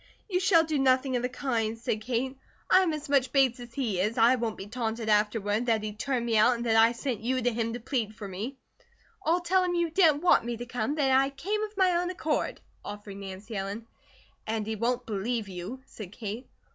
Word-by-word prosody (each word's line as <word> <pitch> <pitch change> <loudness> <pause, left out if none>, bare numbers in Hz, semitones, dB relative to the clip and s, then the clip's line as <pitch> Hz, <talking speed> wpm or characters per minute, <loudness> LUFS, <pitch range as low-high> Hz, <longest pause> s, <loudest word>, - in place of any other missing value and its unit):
"You 365 -4 0
shall 365 -3 +5
do 310 -3 -1
nothing 260 0 +3
of 245 - +1
the 250 - -1
kind," 235 -4 -1
said 220 -2 -2
Kate. 255 +3 -2 0.4
"I 375 - +7
am 360 -3 +1
as 305 0 -5
much 275 -2 +2
Bates 265 -3 +3
as 240 -1 -9
he 225 -9 -1
is. 210 +5 0
I 235 +3 +6
won't 230 -3 -3
be 195 - -7
taunted 225 0 -3
afterward 210 +2 +1
that 220 -2 +2
he 215 -1 -4
turned 240 +2 -2
me 230 -1 0
out 230 +4 +5
and 235 0 -4
that 225 -1 +2
I 225 +1 +6
sent 240 -2 -3
you 255 +3 0
to 245 -1 0
him 230 0 -1
to 240 - -4
plead 230 -3 -2
for 205 - -7
me." 215 +9 -5 0.7
"I'll 345 +1 +2
tell 370 +2 +2
him 355 -1 0
you 340 -1 0
didn't 320 -4 +4
want 360 - +5
me 235 0 -3
to 240 - -6
come, 245 +3 -2
that 280 -3 +2
I 270 +1 +4
came 380 +11 -3
of 430 -1 -5
my 370 -2 +4
own 355 +1 -1
accord," 320 -4 -2 0.2
offered 205 -1 -8
Nancy 200 +3 -8
Ellen. 200 +3 -4 0.6
"And 220 -1 -1
he 220 +1 -3
won't 240 +3 -1
believe 220 +1 -2
you," 195 +8 -7
said 200 -5 -10
Kate. 215 +3 -6
240 Hz, 230 wpm, -28 LUFS, 220-275 Hz, 0.7 s, I